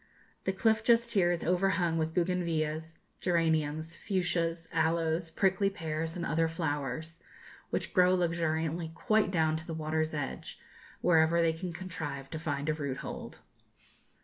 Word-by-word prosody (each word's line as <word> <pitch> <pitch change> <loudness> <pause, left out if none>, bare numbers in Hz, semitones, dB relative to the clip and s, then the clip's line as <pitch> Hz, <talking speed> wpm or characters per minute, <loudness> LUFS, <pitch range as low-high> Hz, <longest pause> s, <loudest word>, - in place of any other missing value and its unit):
The - - +2
cliff 220 +3 +2
just 235 0 +4
here 175 -4 +3
is 175 - -1
overhung 180 -2 +2
with 160 0 -1
bougainvillæas, 165 -3 -1 0.2
geraniums, 160 -2 +1
fuchsias, 170 -4 0
aloes, 165 +1 +1
prickly 195 +3 +2
pears, 160 -3 -3
and 175 -1 -3
other 165 +2 +2
flowers, 160 0 -3 0.5
which - - -2
grow 180 0 +5
luxuriantly 165 -1 0
quite 215 +1 +2
down 160 -4 +2
to 160 - -9
the 165 - -4
water's 155 0 -1
edge, 145 -2 -5 0.4
wherever 165 -1 +4
they 165 -1 +3
can 175 +2 -5
contrive 160 -6 -6
to 160 - -4
find 145 -2 -2
a 155 - +2
root 140 -4 -3
hold. - - -7
165 Hz, 145 wpm, -31 LUFS, 160-180 Hz, 0.5 s, grow